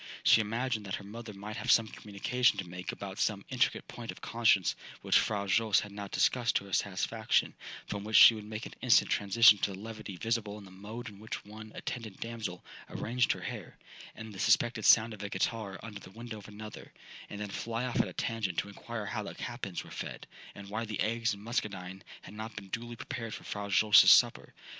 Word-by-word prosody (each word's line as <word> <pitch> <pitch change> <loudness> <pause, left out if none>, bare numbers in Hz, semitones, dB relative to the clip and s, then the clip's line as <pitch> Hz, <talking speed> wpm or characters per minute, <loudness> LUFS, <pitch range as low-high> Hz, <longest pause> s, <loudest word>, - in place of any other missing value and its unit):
She 110 - +6
imagined 115 +1 -2
that 95 - -2
her - - -8
mother 110 +2 -8
might 105 +2 -7
have 125 - -4
some 115 -3 +6
communication 110 +3 0
to 95 -3 -4
make 90 +1 -5
about 100 -1 -7
some 100 -2 0
intricate 130 -2 0
point 120 -1 -9
of - - -6
conscience 110 -5 +2 0.3
which - - +5
Fra 100 -2 -1
Jose 110 +1 +3
had 105 - -9
not 100 -1 -7
discussed 120 0 +2
to 100 - +1
her 100 - -11
satisfaction, 105 +3 +1 0.3
from 100 -1 -5
which 110 +1 -3
she - - +10
would 110 -1 -7
make 105 +2 -6
an - - -9
instant 125 -2 +4
transition 105 +1 +6
to 100 - -1
the - - -8
levity 110 -1 -8
visible 110 -1 -2
in 105 - -11
the 95 - -14
mode 110 +6 -8
in 100 -2 -10
which 110 -1 -6
one 110 +1 -10
attendant 115 -6 -6
damsel 110 -6 -5 0.2
arranged 120 +1 0
her - - -9
hair, - - -7 0.4
and 110 -1 -9
the 95 - -9
suspected 120 +1 +2
sound 115 0 +6
of 105 - -9
a 105 - -4
ghitarra 100 0 -2
under 105 -3 -7
the 95 - -13
window 115 +2 -8
of 100 - -13
another, 105 0 -10 0.4
and 105 - -7
then 105 -1 -4
fly 115 +4 -3
off 125 - +1
at - - -3
a - - -8
tangent 110 -7 -2
to 100 - -1
inquire 110 +2 -6
how 105 +1 -3
the 100 - -7
capons 120 -7 -5
were - - -14
fed, - - -6 0.3
and 100 -1 -10
why 110 +2 -2
the 110 -2 -5
eggs 115 0 0
and 100 - -13
Muscadine 95 -5 -3 0.2
had 95 - -11
not 110 +1 -7
been 100 -2 -8
duly 120 +3 -5
prepared 115 -3 -5
for - - -10
Fra 100 0 -5
Jose's 105 +1 +7
supper. - - +4
105 Hz, 220 wpm, -31 LUFS, 100-115 Hz, 0.4 s, she